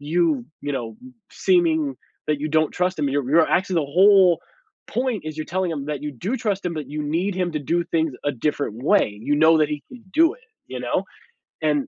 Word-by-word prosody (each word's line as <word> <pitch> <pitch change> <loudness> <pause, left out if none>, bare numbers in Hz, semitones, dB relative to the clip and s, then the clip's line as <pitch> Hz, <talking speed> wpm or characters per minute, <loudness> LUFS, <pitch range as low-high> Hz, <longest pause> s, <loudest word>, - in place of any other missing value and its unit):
you, 155 -3 +1 0.2
you 145 - -3
know, 120 -5 -4
b 255 0 -13 0.2
seeming 160 -7 +2 0.3
that 150 -2 0
you 155 - -2
don't 155 0 +2
trust 180 -1 -1
him. 145 - +1
You're 135 -2 -1
you're 160 +2 +5
actually, 190 0 +1
the 160 - +3 0.2
whole 190 -4 +6 0.5
point 250 -4 -2
is 155 -1 -5
you're 155 - -4
telling 185 0 -1
him 145 -3 -4
that 150 -2 -4
you 150 -1 -4
do 190 - -3
trust 210 -5 -2
him, 170 - -2
but 155 -3 -5
you 150 +1 -4
need 170 +6 -1
him 180 -2 -1
to 155 - -1
do 170 +4 0
things 160 -4 0
a 145 - +2
different 125 -2 -2
way, 110 - +2
you 145 - +1
know 160 +2 +6
that 155 -1 +3
he 150 -1 -4
can 245 -4 -13
do 330 +3 +4
it, - - -21 0.3
you - - -6
know? - - -1 0.6
And 150 -3 +1
160 Hz, 225 wpm, -23 LUFS, 145-185 Hz, 0.6 s, whole